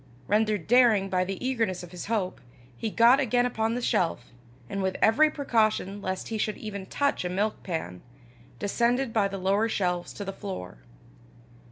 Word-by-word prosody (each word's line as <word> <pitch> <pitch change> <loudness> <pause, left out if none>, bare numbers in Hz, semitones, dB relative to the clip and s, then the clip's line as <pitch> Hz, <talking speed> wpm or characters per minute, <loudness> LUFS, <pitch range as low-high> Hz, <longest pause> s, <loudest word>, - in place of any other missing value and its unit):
Rendered 210 -3 +1
daring 225 -6 +4
by 185 -1 +2
the 190 +1 -4
eagerness 225 -9 -1
of 175 - -11
his 180 +1 -7
hope, 205 -5 -2 0.3
he 220 - -3
got 235 +5 +5
again 245 -2 +2
upon 225 -1 -1
the 245 - -3
shelf, 165 - 0 0.4
and 195 +9 -3
with 190 0 -1
every 300 +8 +5
precaution 215 -8 0
lest 185 -1 -4
he 220 -1 -3
should 215 -1 -1
even 200 -3 -6
touch 285 -5 0
a 180 - -2
milkpan, 180 - -3 0.6
descended 235 +4 0
by 210 -3 +3
the 195 0 -5
lower 200 +4 +1
shelves 180 -4 -1
to 205 - -6
the 195 - -4
floor. 90 - -7
205 Hz, 170 wpm, -27 LUFS, 185-230 Hz, 0.6 s, got